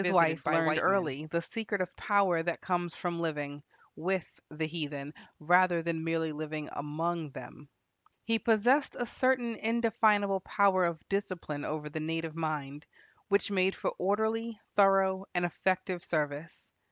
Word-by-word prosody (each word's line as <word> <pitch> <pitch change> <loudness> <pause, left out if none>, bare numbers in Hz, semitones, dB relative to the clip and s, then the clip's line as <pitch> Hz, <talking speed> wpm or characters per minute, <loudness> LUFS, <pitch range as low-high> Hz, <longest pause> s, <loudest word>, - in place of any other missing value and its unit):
Both 180 0 +2
Livingstone 165 -3 +6
and - - -2
his 145 - -17
wife 165 -1 +3
learned 155 0 +3
early 155 -6 -1
the 170 +2 -1
secret 215 +1 -3
of 185 -1 -3
power 195 -5 +2
that 170 0 -2
comes 175 -2 -2
from 175 -1 -3
living 145 -3 -3 0.3
with 185 +1 -3
the 155 +1 -3
heathen, 150 -3 -5 0.3
rather 175 +1 +4
than 165 -1 -2
merely 165 -1 0
living 155 0 -5
among 160 +2 -2
them. 140 +3 -10 0.5
He 225 0 +1
possessed 240 +7 +3
a 245 - -1
certain 245 -2 +1
indefinable 220 -3 +2
power 190 -1 +3
of 170 -2 -3
discipline 180 -7 -3
over 150 -1 -3
the 150 +1 -5
native 165 0 -3
mind, 150 -2 -4 0.4
which 200 0 +2
made 190 -1 +2
for - - -2
orderly, 220 +3 0 0.2
thorough, 195 -1 +4
and 175 0 +2
effective 185 0 -1
service. 150 0 -3
175 Hz, 155 wpm, -31 LUFS, 155-200 Hz, 0.5 s, Livingstone